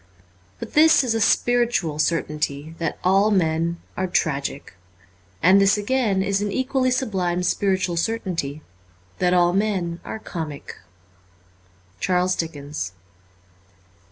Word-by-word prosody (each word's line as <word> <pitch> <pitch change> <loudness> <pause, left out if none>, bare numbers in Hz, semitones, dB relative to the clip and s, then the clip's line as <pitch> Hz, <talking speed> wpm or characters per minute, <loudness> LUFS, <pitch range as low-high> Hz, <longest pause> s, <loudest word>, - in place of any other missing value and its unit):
But - - -8
this 315 -1 +6
is 245 -3 0
a 225 - -1
spiritual 235 -12 +1
certainty, 150 -2 -1
that 165 - -2
all 195 +3 +4
men 170 -3 0 0.2
are 185 - -1
tragic. 140 - -2 0.7
And 190 +4 +6
this 195 +1 +4
again 210 -3 0
is 200 0 0
an 205 -1 -2
equally 260 +2 0
sublime 190 -9 -1
spiritual 185 -1 0
certaintyi 170 -8 -2 0.6
that 180 0 +2
all 175 0 +3
men 190 -4 -1
are - - -6
comic. 160 -8 -7 1.2
'Charles 185 0 +1
Dickens.' 145 - -5
180 Hz, 115 wpm, -22 LUFS, 165-210 Hz, 1.2 s, this